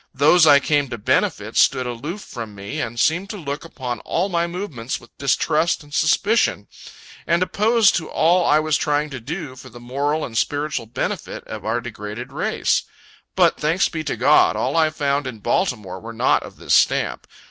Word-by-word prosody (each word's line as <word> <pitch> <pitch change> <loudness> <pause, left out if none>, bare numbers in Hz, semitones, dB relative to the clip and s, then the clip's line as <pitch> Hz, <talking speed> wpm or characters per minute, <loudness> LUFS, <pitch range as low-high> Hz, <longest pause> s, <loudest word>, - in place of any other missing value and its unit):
Those 155 +5 +5
I 140 - +8
came 145 -1 +1
to 120 - -5
benefit, 105 - 0
stood 130 - +3
aloof 145 - -5
from 115 - -8
me, 100 +1 -5
and 120 0 -4
seemed 175 +9 +1
to 215 - -5
look 145 -5 -5
upon 125 -7 -5
all 180 - -1
my 170 -2 0
movements 170 - -5
with 120 - -19
distrust 155 +4 +1
and 145 0 -17
suspicion, 200 +9 +2 0.6
and 170 +1 +3
opposed 220 +3 +3
to 160 - -5
all 175 +3 +3
I 150 - +4
was 155 -1 +1
trying 150 0 0
to 130 - -6
do 145 +2 -6
for 130 0 -12
the 120 +1 -12
moral 140 +5 -2
and 115 - -9
spiritual 145 0 -1
benefit 120 +3 -4
of - - -8
our 110 +2 0
degraded 120 +2 -7
race. - - 0 0.5
But, - - +3
thanks 160 +5 +1
be 160 -2 -4
to - - -2
God, - - +4
all - - -1
I 160 -1 +4
found 145 -3 -1
in 125 -3 -6
Baltimore 105 - -1
were 115 +3 -9
not 110 - +2
of - - -11
this - - -2
stamp. - - +2
145 Hz, 190 wpm, -21 LUFS, 120-165 Hz, 0.6 s, I